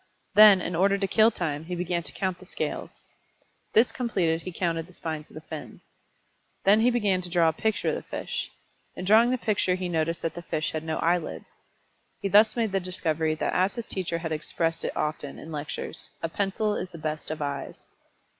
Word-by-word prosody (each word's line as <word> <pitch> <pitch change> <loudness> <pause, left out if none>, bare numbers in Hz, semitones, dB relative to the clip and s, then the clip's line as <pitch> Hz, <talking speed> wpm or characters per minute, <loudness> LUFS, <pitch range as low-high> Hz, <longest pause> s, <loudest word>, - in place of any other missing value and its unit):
Then, 210 -3 +9
in 175 0 -3
order 195 +3 +3
to 195 0 0
kill 220 +3 +5
time, 160 -8 -3
he 180 +1 -4
began 175 0 -1
to - - -6
count 185 -2 -2
the 185 - -13
scales. - - -4 0.7
This 225 +3 +5
completed 180 -10 0
he 185 - -6
counted 165 -2 -1
the 185 - -17
spines 155 -2 -5
of - - -17
the 155 - -7
fins. 155 -1 -8 0.8
Then 200 +3 +6
he 235 +2 +5
began 205 -6 +1
to 180 - -6
draw 170 -2 +4
a - - -2
picture 220 +6 0
of - - 0
the - - -6
fish. - - -4 0.5
In 180 - -5
drawing 220 +5 +6
the 255 - +1
picture 205 -5 +1
he 185 0 -3
noticed 165 0 -1
that 165 - -1
the 175 - -7
fish 155 -2 -2
had 155 0 -3
no 160 -1 -2
eyelids. 170 0 0 0.7
He 195 - -2
thus 215 +2 +6
made 225 -4 0
the 195 - +1
discovery 165 -3 -1
that - - -1
as 185 +2 +2
his 235 -2 -4
teacher 175 -3 -2
had 165 -1 -4
expressed 165 +1 -1
it - - -3
often, 150 -2 -3
in 160 - -9
lectures, 150 +1 -5
"a 165 - 0
pencil 205 +3 0
is 180 - -3
the 170 - -10
best 155 -1 -3
of 155 - -3
eyes." 140 -1 -5
175 Hz, 210 wpm, -27 LUFS, 160-200 Hz, 0.8 s, Then